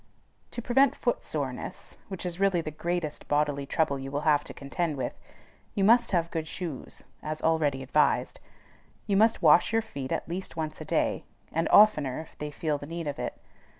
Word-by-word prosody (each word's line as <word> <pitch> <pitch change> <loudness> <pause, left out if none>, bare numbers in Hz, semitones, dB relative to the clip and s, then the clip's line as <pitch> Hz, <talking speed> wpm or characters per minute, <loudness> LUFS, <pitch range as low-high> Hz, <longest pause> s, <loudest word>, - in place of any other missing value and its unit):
To 240 - -6
prevent 265 +3 +4
foot 240 - -1
soreness, 135 -5 -5
which 190 -2 -6
is 175 0 -4
really 195 -3 +3
the 155 - -5
greatest 165 0 -3
bodily 145 -1 0
trouble 140 -3 +1
you 135 0 -6
will 145 +1 -2
have 150 -2 +3
to - - -8
contend 150 +2 -3
with, 125 -2 -2 0.6
you 195 - +1
must 235 +3 +5
have 170 -3 0
good 160 -2 -3
shoes 165 -5 -6 0.2
as 155 0 -4
already 150 -5 +1
advised. 150 +3 +1 0.7
You 200 - +1
must 220 -1 +3
wash 160 +6 +6
your 225 0 +2
feet 140 -11 -6
at - - -2
least 175 0 -5
once 155 -1 -4
a - - -6
day, - - 0 0.3
and 165 +1 0
oftener 150 -12 +5
if 160 - -10
they 150 - -3
feel 150 0 -2
the 145 - -8
need 165 +1 -5
of 145 - -4
it. - - -4
160 Hz, 190 wpm, -28 LUFS, 145-185 Hz, 0.7 s, wash